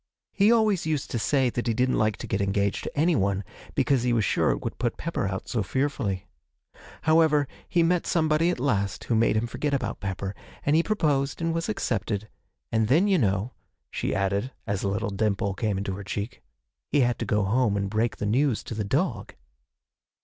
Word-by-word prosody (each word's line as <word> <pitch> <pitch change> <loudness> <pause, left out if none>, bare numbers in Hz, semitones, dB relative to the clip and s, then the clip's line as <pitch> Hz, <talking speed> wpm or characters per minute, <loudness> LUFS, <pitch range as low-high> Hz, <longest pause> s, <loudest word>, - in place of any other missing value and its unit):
He 205 +3 +4
always 215 -7 +3
used 150 -4 -1
to 120 - -1
say 130 +1 +2
that 120 +1 -3
he 115 - +1
didn't 125 +2 +2
like 110 -1 +1
to - - -6
get 100 - -1
engaged 100 0 0
to - - -6
anyone, 100 - +2 0.3
because 135 -3 +2
he 120 0 +1
was 110 -4 +2
sure - - +2
it - - -1
would - - -5
put 120 -2 -1
Pepper 150 -9 -2
out 95 +2 -4
so 115 - -1
fearfully. 110 -4 -1 0.8
However, 155 -3 +4 0.2
he 170 - +3
met 175 +1 +1
somebody 160 0 +2
at 180 - -1
last 100 -8 0
who - - -1
made 110 -1 +3
him 110 - +1
forget 140 +4 -1
about 135 - -3
Pepper, 95 0 -4 0.3
and 145 - +3
he 165 - +5
proposed 145 -9 0
and 165 0 0
was 165 +4 -2
accepted 110 - -2 0.4
and 110 -1 +2
then, 160 - +4
you 195 -3 +3
know,' 100 +1 0 0.4
she - - -2
added, 100 +5 0
as 100 -2 -2
a - - -1
little 100 +2 -2
dimple 100 -1 0
came 105 -1 -1
in 100 - -3
her 95 +1 -4
cheek, 100 +4 -5 0.5
'he 145 - +3
had 120 -1 +1
to - - -2
go 105 -1 +1
home 105 +1 +2
and 100 0 -1
break 110 +3 0
the - - -3
news 125 +3 +1
to - - -6
the 110 -1 -2
dog.' 120 - -1
120 Hz, 205 wpm, -26 LUFS, 100-150 Hz, 0.8 s, he